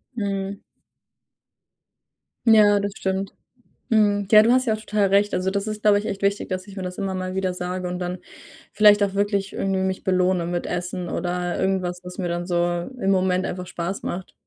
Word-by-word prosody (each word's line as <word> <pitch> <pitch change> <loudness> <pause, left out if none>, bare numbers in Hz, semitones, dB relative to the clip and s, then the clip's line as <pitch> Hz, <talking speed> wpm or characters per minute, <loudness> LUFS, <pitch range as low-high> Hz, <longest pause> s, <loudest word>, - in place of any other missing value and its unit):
Mhm. 200 -2 -3 1.8
Ja, 210 -2 +6
das 200 0 -3
stimmt. 190 0 -2 0.6
Mhm. 205 -3 +2
Ja, 215 -1 +9
du 235 +2 +4
hast 255 0 +3
ja 220 - +2
auch - - -4
total 210 -2 +1
recht. 200 +2 +3
Also, 185 +1 0
das 200 +1 -2
ist, 215 -1 -4
glaube 205 -1 +5
ich, 205 - -5
echt 195 - -4
wichtig, 200 +1 0
dass 185 +1 -3
ich 200 - -12
mir 190 - -4
das 180 +1 -6
immer 195 -1 -2
mal 185 0 -4
wieder 190 -1 -1
sage 180 0 -4
und 180 0 -4
dann 180 0 -4 0.5
vielleicht 210 0 +6
auch 195 -1 0
wirklich 200 -1 0
irgendwie 195 -1 -1
mich 190 0 -2
belohne 185 -1 +2
mit 175 0 -2
Essen 180 0 -4
oder 175 0 -2
irgendwas, 185 -2 -1
was 180 0 -9
mir 180 -2 -2
dann 175 0 -3
so 175 -1 0
im 195 - +1
Moment 185 0 +2
einfach 180 0 -5
Spaß 175 +3 -4
macht. 180 +1 -5
190 Hz, 200 wpm, -23 LUFS, 180-205 Hz, 1.8 s, Ja